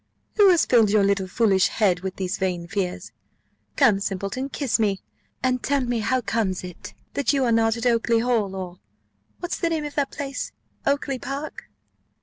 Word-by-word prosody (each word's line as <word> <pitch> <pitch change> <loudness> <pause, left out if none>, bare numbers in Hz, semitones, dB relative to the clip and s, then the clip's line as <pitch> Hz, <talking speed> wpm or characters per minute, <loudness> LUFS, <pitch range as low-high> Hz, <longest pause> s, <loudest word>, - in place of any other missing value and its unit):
"Who 410 -2 +7
has 350 -3 +4
filled 230 -4 +4
your 205 0 +4
little 195 -1 +1
foolish 195 -2 +3
head 190 -5 +1
with 190 0 -5
these 190 +2 -3
vain 180 -3 -1
fears? 185 -1 -3 0.6
Come, 230 -9 +4
simpleton, 200 +7 -3
kiss 270 -4 0
me, 200 -3 +1 0.4
and 255 -1 +1
tell 280 -1 +1
me 240 -2 -1
how 230 +4 +1
comes 210 -5 -1
it 180 -1 -9 0.2
that 280 0 +1
you 275 -2 +2
are 235 - +2
not 225 0 +3
at 230 - -4
Oakly 235 -1 +3
hall, 225 -5 +1
or 180 -1 -6 0.6
What's 350 - -3
the 335 - +1
name 315 -2 -1
of 295 - -6
the 285 -2 +1
place? 275 -1 -5 0.3
Oakly 280 -1 0
park?" 280 +4 -6
225 Hz, 180 wpm, -24 LUFS, 195-270 Hz, 0.6 s, Who